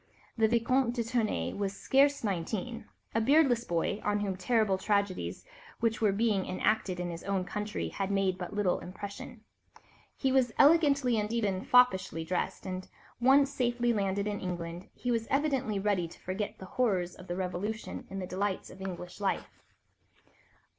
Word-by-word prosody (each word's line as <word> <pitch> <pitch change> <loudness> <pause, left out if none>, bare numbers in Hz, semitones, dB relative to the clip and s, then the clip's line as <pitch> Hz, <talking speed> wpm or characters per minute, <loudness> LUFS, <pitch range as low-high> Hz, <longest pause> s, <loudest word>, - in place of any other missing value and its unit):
The 225 -1 +4
Vicomte 240 +2 +2
de 235 - 0
Tournay 220 - -1
was 200 -1 -3
scarce 280 +4 +3
nineteen, 210 +4 -3 0.3
a 225 - +2
beardless 265 -2 +4
boy, 175 +5 -1
on 210 0 +1
whom 200 -1 -1
the 185 - -5
terrible 210 -1 +2
tragedies 200 -2 -1 0.3
which 230 -1 0
were 215 -2 +4
being 205 -1 +1
enacted 185 -1 0
in 175 -1 -2
his 165 - -7
own 195 -2 0
country 210 +2 -3
had 195 -1 -3
made 195 -2 +1
but 180 - -5
little 205 -3 +1
impression. 200 +6 -8 0.8
He 265 - +1
was 255 -3 +3
elegantly 280 -6 +5
and 210 +1 -2
even 205 -5 0
foppishly 190 -9 +4
dressed, 180 +3 -2
and 185 0 -5 0.3
once 270 +3 +5
safely 240 -2 +1
landed 200 -1 0
in 205 -1 -2
England 175 -1 -5
he 245 - -2
was 230 -1 0
evidently 270 -6 +1
ready 195 -3 +1
to - - -14
forget 190 +3 -4
the 190 - -9
horrors 185 -5 0
of 185 - -13
the 175 - -3
Revolution 190 +4 -4
in 195 - -6
the 190 - -3
delights 190 +1 -2
of 190 - -12
English 180 -1 -6
life. 195 - -2
205 Hz, 165 wpm, -30 LUFS, 185-235 Hz, 0.8 s, elegantly